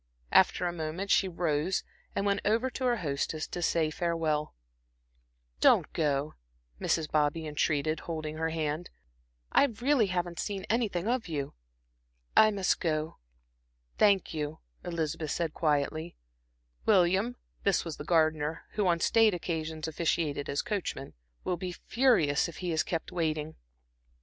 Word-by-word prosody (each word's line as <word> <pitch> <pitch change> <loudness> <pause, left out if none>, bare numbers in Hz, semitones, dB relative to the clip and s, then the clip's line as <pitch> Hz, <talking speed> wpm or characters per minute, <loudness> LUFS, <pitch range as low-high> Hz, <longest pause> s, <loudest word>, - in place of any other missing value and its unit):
After - - +4
a 175 - -1
moment 170 +4 -3
she 195 - +4
rose 170 0 0 0.3
and 200 - 0
went 200 0 +1
over 230 +5 +1
to 260 - -3
her 245 -1 +3
hostess 155 -1 -2
to 175 - -4
say 165 -2 +1
farewell. 160 - -1 1.0
"Don't - - +4
go," 145 -1 0 0.5
Mrs. 160 -2 0
Bobby 155 +1 +1
entreated, 150 +1 0
holding 155 -2 -5
her 160 0 0
hand, 160 +1 -2 0.6
"I - - +6
really 250 -1 +2
haven't 175 -2 -2
seen 200 -2 -3
anything 215 -5 0
of 240 -2 0
you." 145 -4 -3 0.8
"I 215 - +8
must 200 -3 +1
go, 155 -1 -2 0.8
thank 200 -5 +4
you," 150 0 -3 0.3
Elizabeth 165 -2 -2
said, 165 0 -1
quietly. 155 +2 0 0.7
"William," 195 +4 +3 0.3
this 200 -3 +2
was 165 -3 -5
the - - -6
gardener, 155 -1 +1
who 210 -3 0
on 170 -1 +3
state 220 +2 +4
occasions 160 -2 -3
officiated 155 -3 -1
as 140 - 0
coachman 200 - -3 0.3
"will 180 - -1
be 180 0 -4
furious 175 - +2
if 170 - -10
he 180 -2 -3
is 160 -1 +2
kept 165 -2 -3
waiting." 155 -2 -2
165 Hz, 140 wpm, -30 LUFS, 155-190 Hz, 1.0 s, I